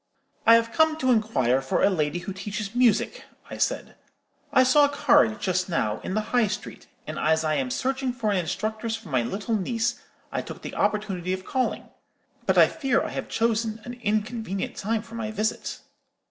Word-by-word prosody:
"'I 230 - +10
have 230 0 +2
come 315 -1 +3
to 260 -4 +2
inquire 135 - +2
for 135 - 0
a - - +6
lady 155 -2 0
who 175 +2 -5
teaches 205 +2 -5
music,' 240 -4 +2 0.3
I - - -5
said; - - -1 0.6
'I 260 - +6
saw 285 +3 +6
a - - 0
card, 280 -6 +3
just 185 0 0
now, 110 -10 0
in 185 - -4
the 215 0 -2
High 240 -3 +4
Street, 210 +1 -6 0.2
and 155 0 -5
as 160 +1 +2
I 155 -1 +1
am 135 -4 0
searching 260 - -1
for 235 -4 -1
an 200 - +1
instructress 215 +6 -2
for 225 -5 -10
my 130 -3 +2
little 200 - -2
niece, 230 +3 -1 0.3
I - - -1
took - - -9
the - - -6
opportunity 190 -4 -1
of 185 0 -5
calling. 255 -1 -1 0.6
But - - +3
I - - +9
fear 270 -6 0
I - - -3
have - - -5
chosen 225 -1 0
an 245 - -7
inconvenient 215 -2 -2
time 220 +1 -1
for 230 - -15
my 225 -1 -3
visit.' 215 0 -2
215 Hz, 195 wpm, -25 LUFS, 185-235 Hz, 0.6 s, I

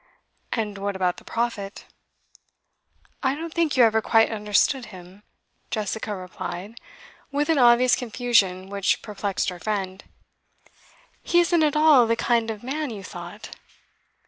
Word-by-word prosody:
'And 210 -3 -3
what 200 0 -3
about 180 -2 0
the - - -13
Prophet?' 225 -4 -4 1.4
'I 265 0 +1
don't 325 +2 -6
think 330 -5 0
you 250 - +7
ever 220 -1 +4
quite 225 +1 +3
understood 215 +5 +1
him,' 185 0 -13 0.5
Jessica 215 0 -3
replied, 185 +3 -7 0.5
with 290 +3 -1
an 320 -3 +3
obvious 245 0 +5
confusion 225 -6 +1
which 200 -1 0
perplexed 200 -2 -2
her 180 -1 -8
friend. 190 -1 -3 1.2
'He 345 - +2
isn't 345 -1 +2
at 300 -1 +2
all 300 -6 +6
the 230 - +2
kind 230 -1 +1
of 215 -1 -6
man 290 +3 -3
you 210 -4 -7
thought. 180 +3 -9
220 Hz, 140 wpm, -24 LUFS, 195-255 Hz, 1.4 s, you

